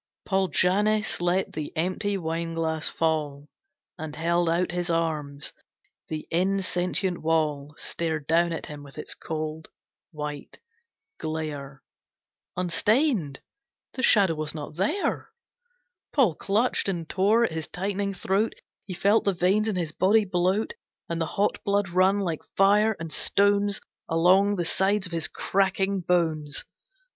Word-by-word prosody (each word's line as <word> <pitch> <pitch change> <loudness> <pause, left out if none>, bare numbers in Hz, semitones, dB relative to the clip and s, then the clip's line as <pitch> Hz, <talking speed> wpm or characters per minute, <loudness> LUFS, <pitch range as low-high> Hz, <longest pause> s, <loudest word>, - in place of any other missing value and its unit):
Paul 190 -1 +1
Jannes 205 +5 +1
let 180 +2 +1
the 150 -1 -4
empty 185 +4 0
wine 165 -1 -3
glass 160 -1 -1
fall, 150 -3 -1 0.5
And 155 -1 -6
held 170 +1 +1
out 175 +2 +1
his 175 0 -2
arms. 155 -4 -2 0.5
The 155 -1 -5
insentient 180 0 0
wall 150 -2 0
Stared 160 -3 -3
down 170 +2 +3
at 165 - -4
him 150 -1 -8
with 140 0 -13
its 150 - -4
cold, 155 0 -5 0.4
white 150 -2 -6 0.6
glare 150 -4 -5 0.7
Unstained! 185 - +1 0.5
The 255 - -4
Shadow 200 -7 +5
was 155 0 -4
not 150 0 -7
there! 210 - -1 0.8
Paul 250 - +3
clutched 205 +6 0
and 170 -4 -3
tore 205 +7 +3
at 205 - +1
his 160 -1 -4
tightening 200 +1 -2
throat. 195 +4 0 0.3
He 185 - -5
felt 200 +5 +3
the 200 - +2
veins 190 +5 +2
in 215 - 0
his 170 -4 -2
body 205 +6 +3
bloat, 185 - 0 0.4
And 170 0 -2
the 165 - 0
hot 200 +5 -1
blood 200 -2 +1
run 185 +3 +3
like 170 -5 -2 0.2
fire 210 +3 +4
and 165 -1 -6
stones 200 0 +2 0.3
Along 185 +5 +4
the 175 -3 -1
sides 195 +3 +1
of 180 - -6
his 165 -1 0
cracking 195 0 0
bones. 160 -4 0
175 Hz, 140 wpm, -26 LUFS, 160-195 Hz, 0.8 s, Shadow